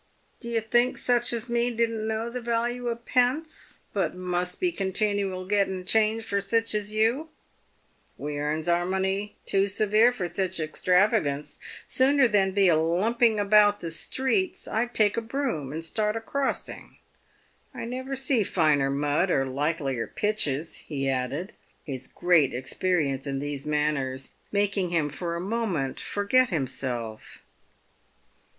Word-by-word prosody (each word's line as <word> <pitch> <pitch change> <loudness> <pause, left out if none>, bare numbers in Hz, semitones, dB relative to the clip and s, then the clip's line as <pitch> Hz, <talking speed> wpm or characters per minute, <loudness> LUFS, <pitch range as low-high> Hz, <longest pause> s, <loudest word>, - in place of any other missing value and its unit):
" - - -39
Do 235 - -6
you 230 -1 0
think 240 +3 +2
sich 240 -1 +2
as 235 0 -2
me 235 0 +2
don't 230 -2 -1
know 220 +1 -2
the 250 +1 -4
value 240 +1 -1
of 235 0 -4
pence, 260 +6 0
but 195 -2 -1
must 180 0 -2
be 360 -1 +1
continual 195 - -1
getting 190 -2 0
change 220 +2 +2
for 200 -2 -1
sich 225 +3 0
as 210 0 -1
you? 230 +9 +1 0.9
We 145 0 -4
earns 155 +2 -2
our 175 0 +2
money 190 +2 -1
too 195 0 +2
severe 215 +4 +3
for 195 -8 -3
sich 185 +1 -2
extravagance. 170 -1 +1 0.3
Sooner 270 0 +4
than 200 -3 +2
be 195 -1 +4
a 170 - +5
lumping 210 +8 +2
about 205 0 +5
the 165 - -5
streets, 215 +3 -1
I'd 240 +2 -1
take 210 -1 +3
a - - +1
broom, 230 - -3
and 160 +2 -4
start 210 +5 -1
a - - -1
crossing. 275 +4 -4 0.7
I - - -6
never 260 +3 -4
see 265 -3 +3
finer 155 -8 +2
mud 145 +6 +1
or 135 -6 +2
likelier 135 -2 -2
pitches," 165 -8 -1
he 135 -3 -4
added, 135 +8 -2 0.3
his 130 -3 -6
great 170 -8 +2
experience 140 0 -1
in 135 -1 -2
these 145 +1 -4
matters 145 -3 -1 0.2
making 200 -2 +1
him 165 -4 +1
for 170 +3 -4
a - - -3
moment 185 - -2
forget 230 +5 +2
himself. 125 - -4
195 Hz, 150 wpm, -26 LUFS, 155-230 Hz, 0.9 s, a